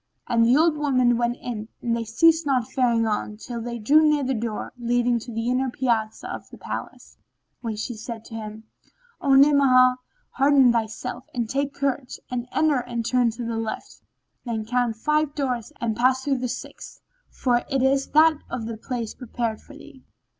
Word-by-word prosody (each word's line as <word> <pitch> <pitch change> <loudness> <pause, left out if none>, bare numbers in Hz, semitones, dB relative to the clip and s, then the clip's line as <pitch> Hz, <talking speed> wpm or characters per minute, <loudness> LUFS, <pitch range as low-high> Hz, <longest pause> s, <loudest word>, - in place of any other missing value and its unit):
and 230 -1 +3
the 240 +4 +5
old 320 0 +4
woman 255 -5 +2
went 240 +1 0
in 220 -3 -5
and 235 -1 -1
they 230 - -2
ceased 325 +9 +3
not 260 -6 +1
faring 235 -3 +2
on, 210 -1 -2
till 235 +1 -6
they 235 +1 -4
drew 280 +8 +4
near 300 -2 +3
the 265 +1 0
door 225 -2 -4
leading 240 0 +1
to 235 +2 -9
the 225 +1 -3
inner 255 +1 +1
piazza 230 -4 -1
of - - -8
the - - -12
palace, - - -7 0.4
when 225 -3 -4
she 220 +3 -4
said 225 0 -8
to - - -12
him, 215 -1 -7 0.6
"O 275 -1 +4
Ni'amah, 270 -3 +6 0.3
hearten 275 -2 +5
thyself 225 +1 -3
and 235 -2 -1
take 275 +3 -2
courage 275 -2 -2
and 245 -1 -3
enter 305 -4 +2
and 240 -2 -4
turn 245 0 +2
to 230 +1 -6
the 230 -1 -3
left: 225 -1 -6 0.4
then 225 -3 -3
count 245 0 0
five 300 +5 0
doors 250 -4 -2
and 230 -3 -1
pass 255 +3 +2
through 275 -2 0
the 250 0 -2
sixth, - - -8 0.3
for 245 -2 +1
it 270 -2 +1
is 270 +1 +2
that 310 0 +4
of 230 -3 -4
the 225 -1 -5
place 235 -1 -4
prepared 230 -3 -4
for 285 - -15
thee. 265 -3 -14
245 Hz, 190 wpm, -24 LUFS, 230-270 Hz, 0.6 s, Ni'amah